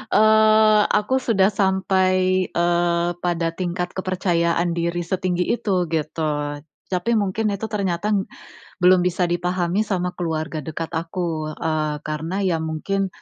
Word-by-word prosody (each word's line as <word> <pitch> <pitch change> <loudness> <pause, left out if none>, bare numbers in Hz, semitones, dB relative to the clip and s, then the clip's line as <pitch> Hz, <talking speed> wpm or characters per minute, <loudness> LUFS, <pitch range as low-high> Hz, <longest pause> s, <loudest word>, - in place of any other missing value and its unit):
eee, 215 0 +5
aku 260 +6 +1
sudah 210 -5 +2
sampai, 185 -1 +2
eee, 175 0 +1
pada 175 -1 -1
tingkat 180 0 -3
kepercayaan 175 -2 0
diri 170 +1 -1
setinggi 180 0 -1 0.2
itu, 185 -4 0
gitu. 155 0 -1 0.6
Tapi 185 +4 -1
mungkin 210 +2 0
itu 200 +3 -4
ternyata, 200 -2 -1 0.7
belum 180 +1 +6
bisa 180 0 0
dipahami 175 +2 0
sama 180 -2 -1
keluarga 160 -2 -3
dekat 160 +2 -5
aku. 165 -2 -3
Eee, 155 -2 -1
karena 160 +5 -3
ya 165 -3 +1
mungkin, 190 +5 -2
180 Hz, 125 wpm, -22 LUFS, 170-190 Hz, 0.7 s, belum